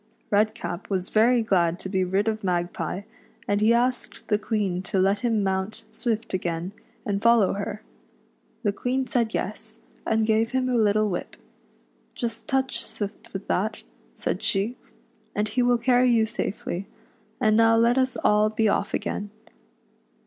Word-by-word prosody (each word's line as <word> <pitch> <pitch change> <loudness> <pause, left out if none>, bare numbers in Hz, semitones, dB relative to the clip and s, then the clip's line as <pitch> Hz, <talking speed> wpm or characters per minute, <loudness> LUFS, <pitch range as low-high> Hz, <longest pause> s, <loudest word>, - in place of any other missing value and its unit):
Redcap 215 -3 0
was 190 -2 -2
very 235 +2 +4
glad 175 -5 +2
to 190 - -6
be 190 -1 0
rid 190 +4 0
of 220 -1 -1
Mag 175 -1 0
pie, 195 +3 -4 0.4
and 205 0 +1
he 220 +2 +5
asked 245 +1 0
the 210 -1 +3
Queen 205 -4 -1
to 190 +1 -3
let 195 +2 +3
him 225 -2 +1
mount 190 +2 -2
Swift 225 -1 -2
again, 175 -1 -2 0.3
and 200 -1 -1
follow 230 -4 +5
her. 200 +2 -4 0.8
The 205 -2 +1
Queen 260 +4 -1
said 235 -3 0
yes, 220 +2 -4 0.3
and 220 0 +1
gave 220 +2 +2
him 260 -1 +1
a 250 - +1
little 215 -1 +3
whip, 180 -3 -4 0.4
" - - -38
Just 235 -2 -4
touch 265 -2 0
Swift 205 0 -6
with 195 0 -6
that," 210 +3 -1 0.3
said - - -2
she, 205 +5 0 0.3
" 220 -1 -38
and 210 +1 0
he 250 +4 +1
will 245 0 +4
carry 250 +1 +3
you 230 -2 +4
safely; 210 -3 -4 0.5
and 215 -4 +3
now 225 0 +5
let 235 +3 +4
us 260 0 0
all 210 +1 +4
be 220 +1 0
ofif 210 - +1
again." 205 0 -3
215 Hz, 170 wpm, -25 LUFS, 195-235 Hz, 0.8 s, he